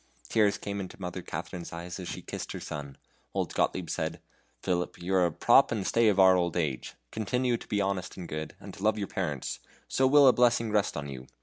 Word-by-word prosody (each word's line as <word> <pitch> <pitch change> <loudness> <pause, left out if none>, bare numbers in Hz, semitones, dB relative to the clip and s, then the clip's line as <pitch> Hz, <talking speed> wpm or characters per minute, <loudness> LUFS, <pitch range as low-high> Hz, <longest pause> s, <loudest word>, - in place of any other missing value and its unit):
Tears 105 -2 +3
came 100 0 -4
into 95 0 -7
Mother 90 0 -5
Katharine's 85 0 -6
eyes 85 +2 -6
as 90 - -6
she - - -6
kissed - - -6
her - - -5
son; 70 -2 -7 0.4
old - - -1
Gottlieb 90 -2 0
said: - - -2 0.4
"Philip, 90 -1 -1
you 90 +2 -3
are 90 -2 +4
the 80 - -12
prop 120 +9 +5
and 105 -4 -1
stay 115 -1 +3
of 100 -2 +3
our 95 -1 +8
old 85 -1 0
age. 75 -6 -2 0.2
Continue 125 +3 0
to - - -12
be 105 -1 0
honest 95 -2 -2
and 90 -2 -6
good, 80 0 -5
and - - -10
to - - -12
love 110 +1 +2
your 100 -2 -2
parents, - - -3 0.3
so 130 - +2
will 140 +1 +7
a 130 - +8
blessing 120 -2 +3
rest 105 -6 +1
on 70 -1 -4
you. 65 -2 -8
95 Hz, 225 wpm, -29 LUFS, 85-110 Hz, 0.4 s, our